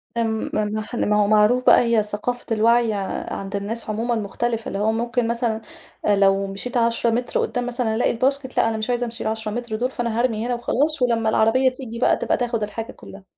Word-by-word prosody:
آمم 225 -1 -1
م 215 +2 -2
ما 210 - +3
هو 210 -1 +3
معروف 215 +4 +4
بقى - - +7
هي 235 -3 +2
ثقافة 210 +4 -4
الوعي 230 +1 +3 0.4
عند 195 +1 -5
الناس 215 +3 -3
عمومًا 230 +3 -1
مختلفة، 225 +2 -2
اللي 195 - -3
هو 215 +2 +2
ممكن 235 +1 -1
مثلًا 235 -1 -1 0.5
لو 195 -1 +3
مشيت 200 +6 -4
10 235 0 +2
متر 240 +2 -1
قدام 245 -1 -2
مثلًا 240 -2 -1
ألاقي 240 - +2
الباسكت 260 +2 -1
لأ، 225 - +4
أنا 220 - -2
مش 215 +2 -3
عايزة 245 0 0
أمشي 230 0 -5
ال10 220 -1 -2
متر 235 0 -4
دول، 250 +4 -1
فأنا 235 -2 -2
هارمي 230 -3 0
هنا 245 - 0
وخلاص 280 +5 0
ولما 230 -3 +2
العربية 225 +4 +3
تيجي 250 -3 -7
بقى - - +3
تبقى - - 0
تاخد 235 -3 -1
الحاجة 220 +2 -5
كلها. 195 0 -13
230 Hz, 200 wpm, -22 LUFS, 215-245 Hz, 0.5 s, بقى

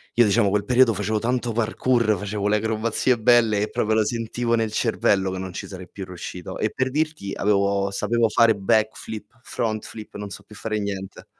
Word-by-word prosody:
io 120 - +6
diciamo 105 0 +3
quel 100 +1 +1
periodo 125 -2 +4
facevo 105 +2 -1
tanto 120 +1 -1
parkour, 115 0 +1
facevo 105 +1 -3
le 105 +1 +3
acrobazie 110 +3 0
belle 110 -2 +4
e 105 - -1
proprio 110 +1 0
lo 110 -1 +3
sentivo 115 +1 -2
nel 110 -2 0
cervello, 100 -4 +1
che 95 - -4
non 95 -1 -6
ci - - -6
sarei 95 -2 -9
più 95 - -7
riuscito. 90 -1 -7
E - - 0
per 130 0 -1
dirti 150 -9 -2
avevo 100 -1 +1
sapevo 115 +3 +1
fare 115 0 +4
backflip, 110 +2 -1
front 110 -2 -2
flip, 110 -1 -10
non 105 0 -6
so 100 +1 -10
più 105 +2 -15
fare 110 0 -3
niente. 95 -2 -5
110 Hz, 195 wpm, -23 LUFS, 100-115 Hz, -, io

